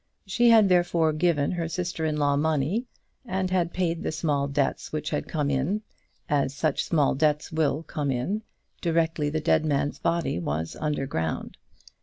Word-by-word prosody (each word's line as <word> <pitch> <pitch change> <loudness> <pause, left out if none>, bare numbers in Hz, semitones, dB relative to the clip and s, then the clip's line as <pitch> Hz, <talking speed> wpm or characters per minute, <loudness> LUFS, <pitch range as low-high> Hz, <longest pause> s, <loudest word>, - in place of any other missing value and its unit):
She 235 +5 +3
had, 220 -3 +7
therefore, 175 -3 +3
given 155 -3 +1
her 170 -2 -2
sister 170 -1 -3
in 155 -1 0
law 145 -1 +2
money, 160 - 0 0.4
and 190 -5 -2
had 175 -2 +1
paid 170 -2 -1
the - - -2
small 150 -3 0
debts 140 -1 -1
which 155 +1 -3
had - - -2
come 145 -3 -1
in, 150 +11 0 0.4
as 140 -2 0
such 155 -1 0
small 150 -5 +2
debts 150 +1 +1
will 155 -1 0
come 150 -3 -3
in, 135 - -1 0.4
directly 165 -3 +1
the 155 +1 -1
dead 155 - +2
man's 145 -1 0
body 170 - 0
was 80 -1 -3
under 150 -3 -1
ground. 80 -10 -3
155 Hz, 170 wpm, -26 LUFS, 145-175 Hz, 0.4 s, had